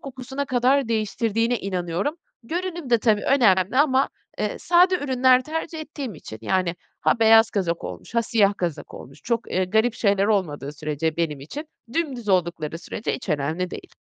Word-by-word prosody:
kokusuna 265 Hz, +1 st, -5 dB
kadar 255 Hz, 0 st, +2 dB
değiştirdiğine 225 Hz, +1 st, 0 dB
inanıyorum. 185 Hz, -, -2 dB, 0.3 s
Görünüm 345 Hz, +1 st, -4 dB
de 235 Hz, -, +5 dB
tabii 215 Hz, -2 st, +2 dB
önemli 205 Hz, -6 st, +3 dB
ama, 270 Hz, -1 st, +4 dB, 0.3 s
eee, -, -, -2 dB
sade 360 Hz, +2 st, +4 dB
ürünler 260 Hz, -5 st, +3 dB
tercih 320 Hz, +2 st, -4 dB
ettiğim 285 Hz, -7 st, -6 dB
için, 110 Hz, -7 st, -10 dB
yani, 180 Hz, +7 st, 0 dB, 0.3 s
ha, -, -, +2 dB
beyaz 225 Hz, 0 st, +6 dB
kazak 175 Hz, -4 st, -1 dB
olmuş -, -, -8 dB
ha, 235 Hz, -, +3 dB
siyah 205 Hz, -3 st, +2 dB
kazak 170 Hz, -4 st, -4 dB
olmuş, 135 Hz, +3 st, -11 dB
çok, 235 Hz, -1 st, -1 dB
ııı, 185 Hz, 0 st, 0 dB
garip 220 Hz, +3 st, +2 dB
şeyler 200 Hz, -3 st, +2 dB
olmadığı 160 Hz, -9 st, -1 dB
sürece 155 Hz, +1 st, -2 dB
benim 155 Hz, -4 st, -1 dB
için, 285 Hz, -, -7 dB, 0.3 s
dümdüz 265 Hz, -8 st, -2 dB
oldukları 170 Hz, -4 st, 0 dB
sürece 175 Hz, +5 st, -4 dB
hiç 250 Hz, -, -8 dB
önemli 160 Hz, +4 st, -1 dB
değil. -, -, -9 dB
220 Hz, 160 wpm, -23 LUFS, 175-260 Hz, 0.3 s, beyaz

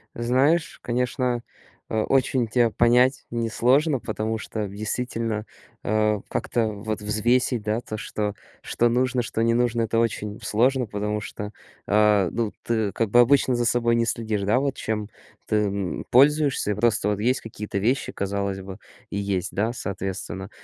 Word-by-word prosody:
Знаешь, 130 Hz, +8 st, +1 dB
конечно, 125 Hz, 0 st, -1 dB, 0.5 s
э, 110 Hz, -, 0 dB
очень 130 Hz, -3 st, +1 dB
тя 120 Hz, 0 st, +3 dB
понять 125 Hz, +4 st, +3 dB
несложно, 125 Hz, +5 st, +2 dB
потому 110 Hz, 0 st, -3 dB
что 110 Hz, -1 st, -4 dB
действительно, 110 Hz, +1 st, -3 dB, 0.4 s
а, 110 Hz, -1 st, +1 dB
как-то 115 Hz, -2 st, -1 dB
вот 105 Hz, 0 st, -4 dB
взвесить, 115 Hz, +3 st, +1 dB
да, 110 Hz, +2 st, -1 dB
то, 110 Hz, -, -6 dB
что 105 Hz, -1 st, -3 dB, 0.3 s
что 120 Hz, -, +1 dB
нужно, 125 Hz, +1 st, +1 dB
что 115 Hz, -, -3 dB
не 115 Hz, 0 st, +3 dB
нужно- 120 Hz, -1 st, +1 dB
это 115 Hz, +1 st, 0 dB
очень 105 Hz, -2 st, -1 dB
сложно, 125 Hz, +4 st, +2 dB
потому 105 Hz, +1 st, -3 dB
что, 105 Hz, 0 st, -6 dB, 0.3 s
а, 105 Hz, -3 st, +4 dB
ну, 115 Hz, -3 st, -1 dB
ты 110 Hz, -4 st, 0 dB
как 115 Hz, -2 st, 0 dB
бы 120 Hz, -, +5 dB
обычно 130 Hz, 0 st, +4 dB
за 120 Hz, 0 st, 0 dB
собой 120 Hz, 0 st, +2 dB
не 115 Hz, 0 st, +2 dB
следишь, 110 Hz, -3 st, -1 dB
да, 105 Hz, +6 st, +2 dB
вот 140 Hz, -1 st, -1 dB
чем 105 Hz, -1 st, -3 dB, 0.4 s
ты, 110 Hz, -, +1 dB
м, 100 Hz, -3 st, -1 dB
пользуешься 140 Hz, -4 st, +4 dB
и -, -, -1 dB
просто 105 Hz, -1 st, +1 dB
вот 105 Hz, -1 st, 0 dB
есть 125 Hz, +5 st, +1 dB
какие-то 105 Hz, -2 st, -5 dB
вещи, 125 Hz, +7 st, 0 dB
казалось 100 Hz, 0 st, -2 dB
бы, 95 Hz, 0 st, -8 dB, 0.3 s
и 100 Hz, -, -6 dB
есть, 95 Hz, -3 st, -2 dB
да, 110 Hz, +4 st, 0 dB
соответственно. 95 Hz, -1 st, -5 dB
110 Hz, 160 wpm, -24 LUFS, 105-120 Hz, 0.5 s, бы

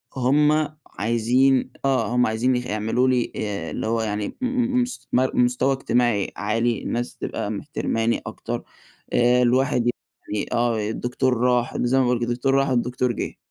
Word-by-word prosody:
هُم 150 Hz, +4 st, +3 dB, 0.2 s
عايزين 125 Hz, +4 st, +2 dB
آه 130 Hz, -6 st, +2 dB
هُم 125 Hz, 0 st, +4 dB
عايزين 120 Hz, +4 st, +1 dB
ي -, -, +1 dB
يعمَلوا 110 Hz, +2 st, 0 dB
لي 125 Hz, -2 st, +1 dB
آآ، 100 Hz, -6 st, -3 dB
اللي -, -, -3 dB
هو 115 Hz, 0 st, 0 dB
يعني 105 Hz, -1 st, -2 dB
م -, -, 0 dB
م 250 Hz, 0 st, +1 dB
مس 245 Hz, 0 st, -4 dB
مر 130 Hz, +1 st, +2 dB
مستوى 125 Hz, +2 st, +2 dB
اجتماعي 120 Hz, -5 st, +1 dB
عالي، 115 Hz, +2 st, 0 dB
الناس 120 Hz, +1 st, -3 dB
تبقى -, -, -4 dB
محترَماني 115 Hz, +1 st, -1 dB
أكتَر، -, -, -5 dB, 0.5 s
آآ، 120 Hz, +1 st, +4 dB
الواحد 125 Hz, -1 st, +2 dB, 0.4 s
يعني 105 Hz, -1 st, -2 dB
آه، 115 Hz, -3 st, +1 dB
الدكتور 125 Hz, +2 st, -1 dB
راح 125 Hz, 0 st, +1 dB
زي 125 Hz, +2 st, +1 dB
ما 135 Hz, -, +4 dB
بيقولوا 125 Hz, -1 st, +1 dB
كده، 120 Hz, 0 st, -1 dB
الدكتور 125 Hz, +3 st, 0 dB
راح 135 Hz, 0 st, +2 dB
الدكتور 125 Hz, 0 st, 0 dB
جه. 115 Hz, -, -4 dB
125 Hz, 165 wpm, -23 LUFS, 115-130 Hz, 0.5 s, هُم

